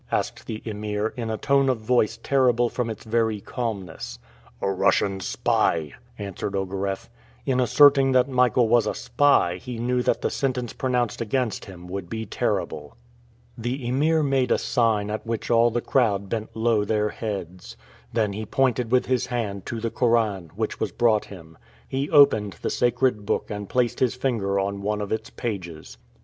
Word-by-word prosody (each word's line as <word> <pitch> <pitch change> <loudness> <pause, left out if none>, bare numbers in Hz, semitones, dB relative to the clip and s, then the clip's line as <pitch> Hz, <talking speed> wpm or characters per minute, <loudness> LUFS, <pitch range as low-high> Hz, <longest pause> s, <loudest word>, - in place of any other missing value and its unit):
asked - - -2
the 110 -1 -5
Emir, 105 0 -3
in 115 -2 -4
a 110 - -2
tone 140 +1 +2
of 130 - +1
voice 115 0 +1
terrible 125 -3 +3
from 120 -1 -2
its 110 - -6
very 110 -1 0
calmness. 100 -7 -5 0.4
"A - - -1
Russian 95 +1 +2
spy," 80 -4 0 0.2
answered 100 0 -5
Ogareff. 95 0 -3 0.4
In 130 -1 +1
asserting 135 +2 +5
that 130 0 +4
Michael 125 -2 +3
was 120 0 +3
a - - -1
spy 140 -11 +2
he 120 +6 -7
knew 125 +2 0
that - - 0
the - - 0
sentence 125 -3 -2
pronounced 125 -4 -1
against 115 0 -1
him 90 -2 -11
would 90 -1 -5
be 110 0 -4
terrible. 75 -2 -3 0.6
The 120 +2 -4
Emir 155 +5 +2
made 135 -3 +1
a - - +3
sign 110 -4 +1
at 110 - -3
which 115 +1 -3
all 115 0 +5
the 120 +1 -1
crowd 100 -8 +1
bent 110 0 -4
low 110 -2 +2
their 105 0 0
heads. 95 -5 -6 0.3
Then 110 -3 0
he 110 +2 -4
pointed 125 -2 +1
with 125 0 +3
his 130 -2 0
hand 105 -6 -3
to 115 - -3
the 115 0 -2
Koran, 110 -8 +1
which - - -3
was - - -1
brought 115 -3 +2
him. 80 -5 -13 0.3
He 135 +2 -2
opened 110 -9 +5
the - - -1
sacred 120 -2 +1
book 100 - -2
and 105 -1 -5
placed 125 -2 0
his 125 -2 +2
finger 110 -7 0
on 100 +1 -2
one 105 +1 -1
of 105 -1 -4
its 110 +1 -2
pages. 90 -9 -6
115 Hz, 175 wpm, -24 LUFS, 100-125 Hz, 0.6 s, asserting